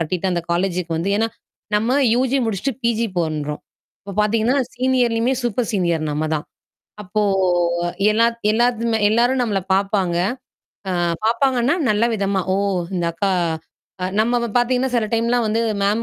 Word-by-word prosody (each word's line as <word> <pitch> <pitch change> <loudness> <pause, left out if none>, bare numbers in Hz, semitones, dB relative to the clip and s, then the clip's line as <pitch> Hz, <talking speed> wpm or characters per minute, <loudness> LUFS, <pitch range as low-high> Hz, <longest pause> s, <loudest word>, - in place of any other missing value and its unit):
கட்டிட்டு 180 +3 -1
அந்தக் 170 -1 -3
காலேஜுக்கு 175 -1 -1
வந்து 170 +5 -1
ஏன்னா 225 +2 +2 0.5
நம்ம 225 +4 +1 0.2
யுஜி 260 +2 +1
முடிச்சுட்டு 225 +5 -1
பிஜி 235 0 +1
பண்றோம். 150 -3 -2 0.4
அப்பப் 200 0 -8
பார்த்தீங்கன்னா, 220 +4 +2 0.2
சீனியர்லயுமே, 250 -1 +1
சூப்பர் 240 0 -1
சீனியர் 170 -6 0
நம்ம 150 +1 -1
தான். 150 - -3 0.6
அப்போ 210 +2 -2 0.9
எல்லாத் 230 +2 +2
எல்லாத்துமே 230 0 +1
எல்லாரும் 240 +4 +2
நம்மளை 205 -5 -1
பார்ப்பாங்க. 195 -3 +1 0.7
அ - - 0 0.3
பார்ப்பாங்கன்னா 250 +3 +2 0.2
நல்ல 210 +2 +2
விதமா, 200 -2 0
"ஓ! - - +1 0.4
இந்த 175 -2 -1
அக்கா" 195 +4 -1 0.7
அ - - 0
நம்மவ 235 +1 +1
பார்த்தீங்கன்னா, 250 +2 +2
சில 230 -3 +1
டைம்லாம் 235 +1 +1
வந்து 220 +2 +1 0.2
மேம் 205 +3 +1
220 Hz, 140 wpm, -20 LUFS, 190-240 Hz, 0.9 s, ஏன்னா